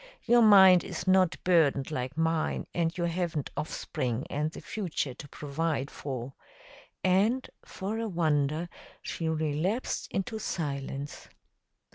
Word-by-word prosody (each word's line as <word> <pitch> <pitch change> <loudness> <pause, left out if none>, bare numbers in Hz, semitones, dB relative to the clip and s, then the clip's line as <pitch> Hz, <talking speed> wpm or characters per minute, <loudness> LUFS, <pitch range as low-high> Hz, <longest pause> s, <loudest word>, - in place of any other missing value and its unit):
Your 240 0 +5
mind 190 -4 +8
is - - -5
not 185 -2 +4
burdened 155 -6 +3
like 130 -1 -3
mine, 160 -1 0
and 170 0 0
you 175 - -1
haven't 170 -4 -2
offspring 130 -5 -3
and 150 +2 0
the - - -10
future 170 - -3
to 145 - -10
provide 145 0 -2
for," 130 -2 -5 0.7
and, 205 +8 +2 0.2
for 205 +4 -4
a 230 - -2
wonder, 155 -2 +1 0.4
she 165 -1 -3
relapsed 160 - -1
into 215 +4 -3
silence. 140 -5 -4
165 Hz, 125 wpm, -29 LUFS, 145-185 Hz, 0.7 s, mind